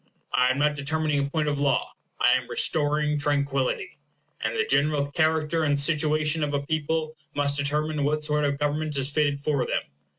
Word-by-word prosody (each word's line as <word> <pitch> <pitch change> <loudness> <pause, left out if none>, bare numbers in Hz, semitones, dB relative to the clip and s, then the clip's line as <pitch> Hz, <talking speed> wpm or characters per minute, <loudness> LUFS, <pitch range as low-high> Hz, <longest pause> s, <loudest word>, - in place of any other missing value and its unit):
I 125 0 +4
am 130 - +1
not 150 +1 +2
determining 150 +1 0
a 140 0 -1
point 155 0 -1
of 145 -1 -1
law, 140 -2 +1 0.3
I - - +5
am - - +1
restoring 150 0 +1
tranquillity; 140 - -1 0.4
and - - -1
the 450 0 +1
general 145 - +1
character 160 +1 +1
and 145 -2 +1
situation 155 +1 +1
of 145 -1 -1
a 140 0 -2
people 155 +1 -1 0.2
must 140 0 +1
determine 150 +1 0
what 150 +2 0
sort 150 0 0
of 140 -1 0
government 150 +1 -1
is 135 +1 +1
fitted 145 -1 +1
for 140 -2 0
them. - - -1
150 Hz, 185 wpm, -25 LUFS, 140-155 Hz, 0.4 s, I